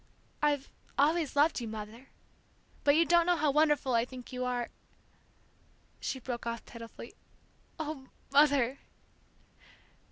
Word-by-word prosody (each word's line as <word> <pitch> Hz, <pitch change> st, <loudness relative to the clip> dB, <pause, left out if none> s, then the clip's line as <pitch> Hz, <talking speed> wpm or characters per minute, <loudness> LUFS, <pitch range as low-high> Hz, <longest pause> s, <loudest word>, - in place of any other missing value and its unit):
"I've 290 Hz, -2 st, +1 dB, 0.3 s
always 310 Hz, +1 st, +2 dB
loved 290 Hz, -1 st, +3 dB
you, 235 Hz, -, -4 dB
Mother, 220 Hz, +4 st, -8 dB, 0.8 s
but 285 Hz, 0 st, +5 dB
you 335 Hz, +2 st, +5 dB
don't 340 Hz, 0 st, +4 dB
know 355 Hz, -, +4 dB
how 305 Hz, -3 st, +2 dB
wonderful 295 Hz, -3 st, +3 dB
I 230 Hz, -1 st, +4 dB
think 250 Hz, 0 st, -9 dB
you 255 Hz, 0 st, -2 dB
are 245 Hz, -1 st, -1 dB, 0.7 s
" -, -, -35 dB
She 265 Hz, -, -3 dB
broke 240 Hz, -1 st, -5 dB
off 235 Hz, 0 st, -4 dB
pitifully, 230 Hz, -1 st, -10 dB, 0.7 s
"Ah, 305 Hz, -3 st, -4 dB, 0.3 s
Mother!" 280 Hz, -3 st, +4 dB
275 Hz, 130 wpm, -31 LUFS, 240-300 Hz, 0.8 s, but